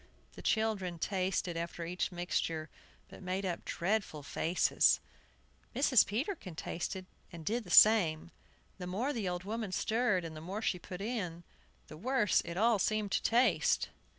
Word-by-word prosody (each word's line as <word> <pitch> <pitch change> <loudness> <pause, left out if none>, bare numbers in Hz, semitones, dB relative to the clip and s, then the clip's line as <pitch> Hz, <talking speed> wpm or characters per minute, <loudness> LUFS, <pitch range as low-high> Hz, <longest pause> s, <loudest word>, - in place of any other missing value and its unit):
The - - -10
children 210 -6 0
tasted 185 -1 -1
after 170 0 -4
each 180 +3 -2
mixture, 165 -3 -2 0.4
but - - -13
made 185 +1 -2
up 175 -2 -3
dreadful 185 -5 -2
faces. 165 +5 +2 0.8
Mrs. 265 -2 +5
Peterkin 225 - -3
tasted, 185 +4 -4 0.3
and 165 -3 -9
did 230 +4 -1
the - - -11
same. 170 -7 +6 0.5
The 180 - -5
more 230 +11 -1
the 215 -7 -2
old 180 0 -4
woman 215 0 -4
stirred, 215 -2 +1
and 160 -1 -7
the 155 - -8
more 195 +7 -5
she 180 - 0
put 180 +1 -8
in, 190 -7 -3 0.4
the 155 - -11
worse 235 -1 +2
it 170 +1 -5
all 225 +1 +3
seemed 215 +1 0
to - - +1
taste. 225 - +2
185 Hz, 155 wpm, -33 LUFS, 170-220 Hz, 0.8 s, same